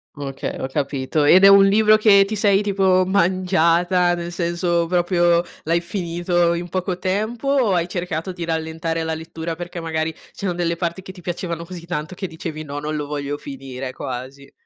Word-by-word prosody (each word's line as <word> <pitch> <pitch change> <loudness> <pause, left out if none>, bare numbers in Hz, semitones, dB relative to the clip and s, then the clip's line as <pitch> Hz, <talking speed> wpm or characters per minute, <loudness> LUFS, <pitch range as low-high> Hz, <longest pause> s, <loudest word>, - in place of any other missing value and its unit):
Okay, 140 -2 -5
ho 130 - -2
capito. 140 +2 -1
Ed 185 +6 +6
è - - +10
un 195 0 +8
libro 215 +2 +5
che 200 -2 +6
ti 215 +2 -4
sei 200 -1 +3
tipo 190 -2 +2
mangiata, 180 -1 +2
nel 175 0 -4
senso 170 0 0
proprio 175 0 +2 0.2
l'hai 170 +2 +1
finito 175 -1 0
in 175 +1 -4
poco 185 0 -2
tempo, 215 +8 -2
o 260 -8 +3
hai 175 0 +1
cercato 175 0 -3
di 175 -2 -5
rallentare 160 0 -2
la 160 0 -2
lettura 160 +1 -6
perché 175 0 -7
magari 160 -1 -2 0.2
ci 200 - -7
sono 180 - 0
delle 170 -1 -1
parti 170 +2 -3
che 190 - -9
ti 180 - -13
piacevano 170 -1 -4
così 170 -1 -9
tanto 155 0 -4
che 190 +1 -5
dicevi 160 -1 -6
"no, 145 -1 -6
non 150 +1 -3
lo 145 -1 -3
voglio 145 0 -4
finire", 135 -1 -7
quasi? 130 +3 -7
170 Hz, 190 wpm, -21 LUFS, 160-185 Hz, 0.2 s, è